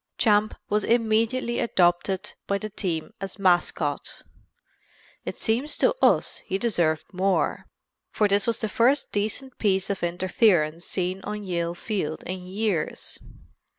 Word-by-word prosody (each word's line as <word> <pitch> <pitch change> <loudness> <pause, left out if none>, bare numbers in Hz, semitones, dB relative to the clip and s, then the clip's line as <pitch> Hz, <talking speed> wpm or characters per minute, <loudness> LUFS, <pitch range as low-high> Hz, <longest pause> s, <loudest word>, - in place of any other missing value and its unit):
Champ 215 -1 +3
was 210 +1 +1
immediately 230 +1 +1
adopted 185 0 +1
by 200 - +1
the 215 +1 -6
team 185 -1 -3
as 195 0 -5
mascot. 180 -3 +1 1.0
It - - -4
seems 250 +7 -1
to - - +3
us - - +3
he 190 - -3
deserved 175 -8 +1
more, 190 +1 0 0.4
for 210 - +2
this 200 +1 +2
was 230 - +1
the 220 - 0
first 250 +7 +2
decent 220 +6 -3
piece 195 -2 +1
of 195 - -3
interference 175 -2 +2
seen 185 +1 -2
on 210 0 -4
Yale 170 -2 -2
field 175 -6 -3
in 185 +1 -4
years. 195 -4 -2
200 Hz, 135 wpm, -25 LUFS, 180-220 Hz, 1.0 s, Champ